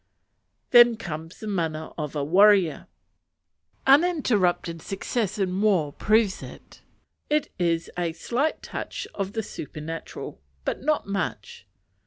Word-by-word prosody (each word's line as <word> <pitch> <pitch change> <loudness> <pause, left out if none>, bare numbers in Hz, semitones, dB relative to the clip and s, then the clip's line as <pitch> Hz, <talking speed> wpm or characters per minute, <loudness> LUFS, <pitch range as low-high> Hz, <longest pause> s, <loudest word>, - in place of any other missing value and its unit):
Then 240 -2 +8
comes 165 -5 -7
the - - -8
mana 165 -6 -2
of 150 -2 -5
a 145 - -1
warrior. 185 0 +4 1.0
Uninterrupted 250 - +3
success 205 +1 -2
in 190 -1 -1
war 180 -9 +2
proves 215 -2 +2
it. - - -12 0.5
It 300 -1 +1
has 170 -1 +1
a 175 -2 -1
slight 250 - -1
touch - - -5
of 195 0 -3
the 220 - -2
supernatural, 155 -1 -7 0.2
but - - -2
not 305 +2 +1
much. 160 - -4
190 Hz, 120 wpm, -25 LUFS, 165-225 Hz, 1.0 s, Then